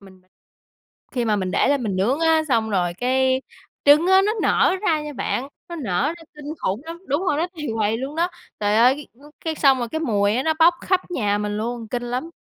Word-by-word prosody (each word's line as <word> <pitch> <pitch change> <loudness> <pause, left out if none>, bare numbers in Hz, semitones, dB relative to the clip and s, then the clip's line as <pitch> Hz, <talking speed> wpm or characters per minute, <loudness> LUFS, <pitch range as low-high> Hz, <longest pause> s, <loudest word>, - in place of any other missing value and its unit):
Mình 190 -2 -17 0.9
khi 245 -2 -1
mà 215 -2 +1
mình 185 -2 -2
để - - +2
lên 280 -3 +1
mình 200 -4 -2
nướng 245 +11 +1
á, 320 -1 +4
xong 225 -4 +1
rồi 175 -3 0
cái 260 +4 +1 0.4
trứng 295 +4 +6
á 380 +1 +6
nó 425 - +2
nở - - +3
ra 325 -7 +2
nha 300 0 -6
bạn, 270 0 -3 0.2
nó 345 - -6
nở 195 - -1
ra 335 - -14
kinh 295 +1 -7
khủng 195 +4 -2
lắm 335 +2 -8
đúng 290 +5 0
rồi 300 -6 0
đó, 335 - +1
tầy 300 -2 -5
quầy 220 0 0
luôn 270 +4 -5
đó. 345 +2 +2 0.3
Trời 205 +1 +2
ơi, 260 +5 +3 0.4
cái 320 -1 -1
xong 275 -3 +4
rồi 240 - -3
cái 315 +7 -3
mùi 215 -3 +1
nó 320 +1 +1
bóc 340 +1 +6
khắp 375 -1 +2
nhà 205 -10 0
mình 210 0 -3
luôn, 230 +1 -4
kinh 245 +2 -3
lắm! 250 +6 -4
260 Hz, 225 wpm, -22 LUFS, 215-315 Hz, 0.9 s, trứng